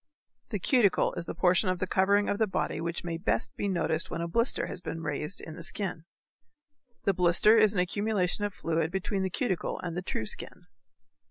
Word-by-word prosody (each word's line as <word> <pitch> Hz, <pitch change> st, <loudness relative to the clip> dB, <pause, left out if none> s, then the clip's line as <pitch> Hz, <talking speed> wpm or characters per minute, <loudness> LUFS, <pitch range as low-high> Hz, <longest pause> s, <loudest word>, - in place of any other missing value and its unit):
The 210 Hz, -, -2 dB
cuticle 205 Hz, -1 st, +3 dB
is 170 Hz, -, -5 dB
the -, -, -4 dB
portion 180 Hz, +2 st, +3 dB
of 185 Hz, -, 0 dB
the 185 Hz, -, -1 dB
covering 200 Hz, +3 st, +2 dB
of 200 Hz, -, -1 dB
the 220 Hz, -, +3 dB
body 190 Hz, -, -2 dB
which 170 Hz, +1 st, -3 dB
may 170 Hz, -1 st, -3 dB
best 215 Hz, +5 st, -1 dB
be 205 Hz, -, -2 dB
noticed 165 Hz, -4 st, 0 dB
when -, -, -4 dB
a 170 Hz, -, -2 dB
blister 230 Hz, +8 st, +2 dB
has -, -, -7 dB
been 165 Hz, -1 st, -5 dB
raised 150 Hz, +4 st, -2 dB
in 160 Hz, -, -8 dB
the -, -, -9 dB
skin. 175 Hz, -2 st, -3 dB, 1.0 s
The 195 Hz, -, +2 dB
blister 180 Hz, +5 st, +5 dB
is 215 Hz, -2 st, +5 dB
an -, -, +1 dB
accumulation 205 Hz, +1 st, 0 dB
of 205 Hz, -, 0 dB
fluid 165 Hz, -3 st, -1 dB
between 190 Hz, +1 st, -2 dB
the 190 Hz, -, 0 dB
cuticle 190 Hz, -3 st, -2 dB
and 170 Hz, -2 st, -4 dB
the 180 Hz, -, -2 dB
true 145 Hz, -11 st, -3 dB
skin. -, -, -5 dB
185 Hz, 205 wpm, -29 LUFS, 170-205 Hz, 1.0 s, blister